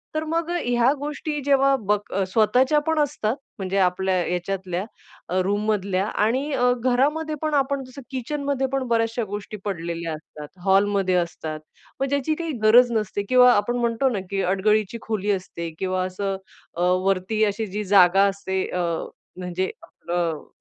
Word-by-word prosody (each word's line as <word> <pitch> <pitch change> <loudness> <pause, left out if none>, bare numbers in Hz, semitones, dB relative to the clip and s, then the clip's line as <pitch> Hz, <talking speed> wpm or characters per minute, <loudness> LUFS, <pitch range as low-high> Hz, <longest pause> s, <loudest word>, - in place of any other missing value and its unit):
तर 310 - 0
मग 330 +1 -1 0.2
ह्या 245 +1 +3
गोष्टी 295 +1 -3
जेव्हा 275 -1 +4
बघ 210 0 +3 0.3
स्वतःच्या 250 +8 +3
पण 320 -1 +2
असतात 250 -5 0 0.2
म्हणजे 190 0 -2
आपल्या 190 0 +2
ह्याच्यातल्या 180 +1 -2 0.6
रूममधल्या 200 -1 0
आणि 255 +9 0
अ, 245 -1 +3
घरामध्ये 295 +5 +1
पण 310 -1 -1
आपण 275 -1 +1
जसं 260 +2 -11
किचनमध्ये 275 +1 -2
पण 270 - +1
बऱ्याचशा 230 0 +1
गोष्टी 205 +1 -6
पडलेल्या 170 -3 -3
असतात. 150 -1 -10 0.2
हॉलमध्ये 195 -1 +3
असतात. 160 -3 -2 0.4
मग 270 - +1
ज्याची 285 +2 0
काही 330 -1 -3
गरज 240 +3 +6
नसते 210 -2 -1
किंवा 250 -1 +7
आपण 240 +4 +1
म्हणतो 235 +2 +1
ना, 210 -5 -2
की 195 -1 -1
अडगळीची 205 +4 +1
खोली 210 -2 -1
असते 180 -3 -4
किंवा 185 -1 0
असं 195 +1 -3 0.4
अ, - - -2
वरती 185 +4 +1
अशी 210 +2 -2
जी 205 +2 -4
जागा 195 -1 +5
असते. 190 -1 -2
अ, 180 - -3 0.6
म्हणजे 180 +1 -2
आपलं 170 -3 -4
210 Hz, 150 wpm, -23 LUFS, 185-260 Hz, 0.6 s, किंवा